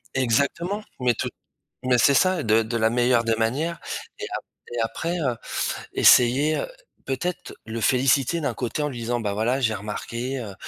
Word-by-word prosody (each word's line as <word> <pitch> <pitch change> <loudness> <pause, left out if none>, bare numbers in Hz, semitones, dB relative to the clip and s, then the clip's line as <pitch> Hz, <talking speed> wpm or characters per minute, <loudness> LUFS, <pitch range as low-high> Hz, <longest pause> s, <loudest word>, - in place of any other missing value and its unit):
Exactement, 140 - 0 0.2
mais 125 -1 +2
tout - - -3 0.5
mais 125 -1 +3
c'est 140 +3 +5
ça, 185 +2 +3
de 110 +1 +3
de 115 +2 -3
la 110 0 +2
meilleure 120 0 +3
des 115 -1 +2
manières. 145 +9 -1 0.4
Et - - -4
ap - - -7 0.3
et 120 - -2
après, 165 +10 -2
heu, 130 -7 0 0.6
essayer, 135 +6 +5
heu, - - -2 0.4
peut-être 140 +7 -3
le 115 +1 -4
féliciter 135 +7 +2
d'un 140 -4 -1
côté 125 +5 -3
en 150 - 0
lui 125 -4 -7
disant: 120 +1 -2
«Bah 105 -2 -2
voilà, 115 +6 0
j'ai 115 -4 +2
remarqué, 115 +5 -4
heu, 100 -4 -7
125 Hz, 180 wpm, -24 LUFS, 115-140 Hz, 0.6 s, c'est